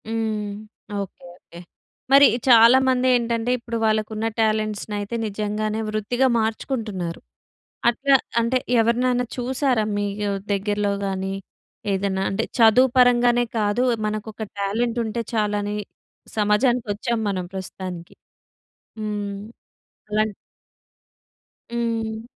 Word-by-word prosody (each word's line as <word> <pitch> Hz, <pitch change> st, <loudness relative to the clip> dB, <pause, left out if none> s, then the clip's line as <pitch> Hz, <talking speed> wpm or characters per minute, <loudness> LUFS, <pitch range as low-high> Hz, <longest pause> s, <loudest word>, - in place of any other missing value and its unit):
హ్మ్. 220 Hz, -2 st, -2 dB, 0.5 s
Okay. 195 Hz, -2 st, -9 dB
Okay. 170 Hz, -1 st, -15 dB, 0.5 s
మరి 280 Hz, +1 st, +9 dB, 0.2 s
చాలామందేంటంటే 245 Hz, -1 st, +5 dB
ఇప్పుడు 235 Hz, -1 st, -5 dB
వాళ్ళకు 215 Hz, -1 st, +1 dB
ఉన్న 220 Hz, +1 st, -1 dB
టాలెంట్స్‌నైతే 215 Hz, -1 st, -1 dB
నిజంగానే 215 Hz, +1 st, -2 dB
వృత్తిగా 215 Hz, +5 st, +1 dB
మార్చుకుంటున్నారు. 220 Hz, -6 st, -3 dB, 0.7 s
అట్లా 270 Hz, +4 st, +3 dB, 0.3 s
అంటే 235 Hz, +2 st, +1 dB, 0.2 s
ఎవరినైనా 245 Hz, +2 st, +2 dB
చూసారా? 255 Hz, -2 st, 0 dB
మీకు 205 Hz, 0 st, -2 dB, 0.2 s
దగ్గర్లో 205 Hz, 0 st, 0 dB
గాని 190 Hz, 0 st, -2 dB, 0.6 s
ఏదన్నా 195 Hz, 0 st, -1 dB
అంటే 220 Hz, +3 st, -1 dB
చదువు 235 Hz, +3 st, +6 dB
పరంగానే 245 Hz, -1 st, +5 dB
కాదు. 210 Hz, +3 st, +1 dB, 0.2 s
మనకొక 215 Hz, +1 st, -5 dB, 0.2 s
టాలెంట్ 225 Hz, +4 st, -1 dB
ఉంటే 225 Hz, +1 st, -3 dB
చాలని 210 Hz, -1 st, 0 dB, 0.6 s
సమాజానికి 220 Hz, +4 st, +2 dB
వచ్చాం 225 Hz, +3 st, -2 dB
మనం 185 Hz, -2 st, -2 dB
ప్రస్తుతానికి. 185 Hz, -2 st, -7 dB, 0.9 s
హ్మ్. 205 Hz, -2 st, -3 dB, 0.7 s
అలాంటి 215 Hz, 0 st, 0 dB, 1.4 s
హ్మ్. 230 Hz, -2 st, -2 dB
220 Hz, 95 wpm, -23 LUFS, 205-235 Hz, 1.4 s, మరి